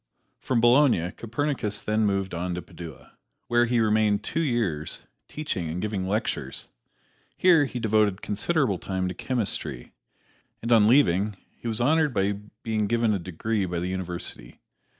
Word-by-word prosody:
From 125 -3 0
Bologna 120 - +4
Copernicus 115 -2 -2
then 110 0 +1
moved 95 -1 -1
on 90 +1 -2
to 90 - -4
Padua, 80 -5 -11 0.3
where 120 0 +4
he 120 0 +1
remained 110 -2 +2
two 160 - -2
years, 115 - -1 0.2
teaching 110 - -3
and 85 +3 -3
giving 100 -2 -2
lectures. 105 +3 -2 0.7
Here 170 -5 +5
he 125 -2 -5
devoted 105 -3 +2
considerable 110 - 0
time 95 0 -2
to - - -4
chemistry, 95 - -3 0.7
and 115 - -4
on 110 -3 +6
leaving 105 -5 +3 0.2
he - - -8
was 110 -2 -1
honored 150 +1 +2
by 100 0 +2 0.3
being 110 -2 0
given 115 0 +2
a 100 - 0
degree 95 +5 -2
by 85 -1 -2
the 90 +2 -2
University. 90 -9 -5
105 Hz, 150 wpm, -26 LUFS, 95-120 Hz, 0.7 s, on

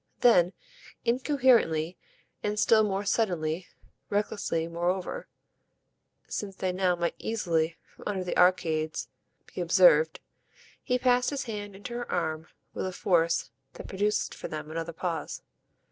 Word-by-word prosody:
Then, 185 -7 +5 0.5
incoherently 235 - +3 0.5
and 210 0 -1
still 220 0 +5
more 200 -1 -1
suddenly, 175 -6 0 0.4
recklessly 200 -5 -1
moreover, 175 +2 -2 1.0
since 195 -2 -4
they 185 -1 -1
now 180 -1 +1
might 170 0 -1
easily, 170 -7 0
from - - -17
under 195 -3 -1
the 180 - -3
arcades, 160 -3 +2 0.4
be - - -3
observed, 165 -3 +5 0.6
he 250 -2 +1
passed 250 0 +3
his 280 -2 -2
hand 205 -3 -6
into 205 +5 -7
her 240 0 -4
arm 160 -2 -1 0.3
with - - -3
a - - -3
force 170 -2 +1 0.2
that - - -9
produced 205 +2 0
for - - -6
them 155 0 -6
another 165 +1 -3
pause. 165 -2 -4
185 Hz, 130 wpm, -28 LUFS, 165-210 Hz, 1.0 s, Then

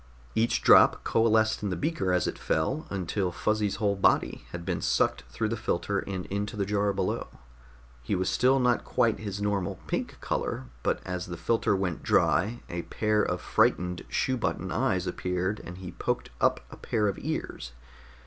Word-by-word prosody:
Each 115 +1 +1
drop - - +7
coalesced 110 -1 +3
in 105 - -1
the 90 - -1
beaker 95 - -1
as 90 -2 +2
it - - -3
fell 130 - -1
until 95 0 -1
Fuzzy's 105 +2 0
whole 100 -2 +1
body 95 - +2
had 85 -1 -6
been - - -2
sucked - - +1
through 110 -1 -2
the 115 - -1
filter 100 -2 -1
and 95 -2 -4
into 100 +1 -3
the 100 - 0
jar 100 0 +1
below. 100 - -2 0.7
He 65 +10 -1
was 95 0 0
still 130 +2 +3
not 125 -1 +2
quite 115 -4 +1
his 100 -1 -4
normal 100 -4 0
pink - - -3
color, - - -2 0.2
but - - 0
as 90 -1 -4
the 85 -1 -6
filter 115 +1 +1
went 95 -4 -2
dry, 110 +8 +2
a 85 0 -3
pair 105 +3 0
of 90 -4 -1
frightened 90 +2 +1
shoe 130 -1 0
button 120 - -2
eyes - - +1
appeared 90 +3 -2
and 90 +1 -8
he 95 -1 -7
poked - - -2
up - - +3
a - - -10
pair 105 -2 0
of 100 - -2
ears. - - -4
100 Hz, 180 wpm, -28 LUFS, 90-110 Hz, 0.7 s, drop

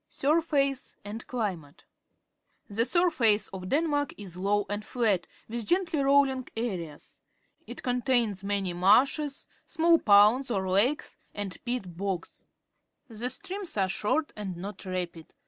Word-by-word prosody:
Siirface 280 -3 0
and 215 +3 -7
Climate. 185 - -4 0.4
— - - -54 0.2
The 225 +2 0
surface 245 - +3
of 185 -1 -7
Denmark 290 -2 0
is 195 -4 -9
low 200 +2 0
and 205 +1 -3
flat, 210 -8 0 0.2
with 230 -1 -5
gently 350 -4 +1
rolling 275 -2 +3
areas. 180 -10 -5 0.5
It - - -8
contains 245 -5 0
many 200 -2 -1
marshes, 265 - +3 0.2
small 330 +1 +3
ponds 210 +6 +5
or 195 -5 -1
lakes, 210 +11 +1 0.2
and 205 -2 -4
peat 240 -8 -3
bogs. 190 -2 -4 0.6
The 230 +2 -2
streams 370 - -2
are 190 -1 +2
short 295 +11 -1
and 195 -4 -5
not 195 +2 -7
rapid. 180 -3 -5
220 Hz, 130 wpm, -28 LUFS, 195-275 Hz, 0.6 s, ponds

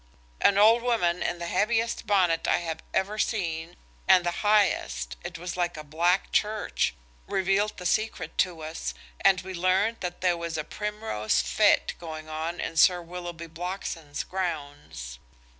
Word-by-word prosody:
An 200 - +5
old 225 +3 +6
woman 215 -8 +1
in 175 - -1
the 170 - -5
heaviest 225 +6 0
bonnet 180 -5 +2
I - - +4
have 165 -2 -4
ever 205 +3 -1
seen 170 -7 -1 0.3
and 180 -1 +6
the 175 - -2
highest–it 65 - +1
was 175 +1 -5
like 175 -2 -1
a 155 - -6
black 170 +5 +1
church–revealed 195 - -1
the 180 - -8
secret 215 +5 -1
to 170 -3 +1
us, 155 - -5 0.2
and 185 -1 +4
we 190 0 -7
learned 185 +6 +2
that 180 -1 -5
there 180 -2 +2
was 170 -1 -4
a 155 - -1
Primrose 185 - -1
fête 65 - +3
going 155 -2 -7
on 160 +2 -4
in 165 - -4
Sir 180 +2 +6
Willoughby 175 -1 -7
Blockson's 165 -3 -5
grounds. 145 - -5
175 Hz, 150 wpm, -27 LUFS, 160-195 Hz, 0.3 s, old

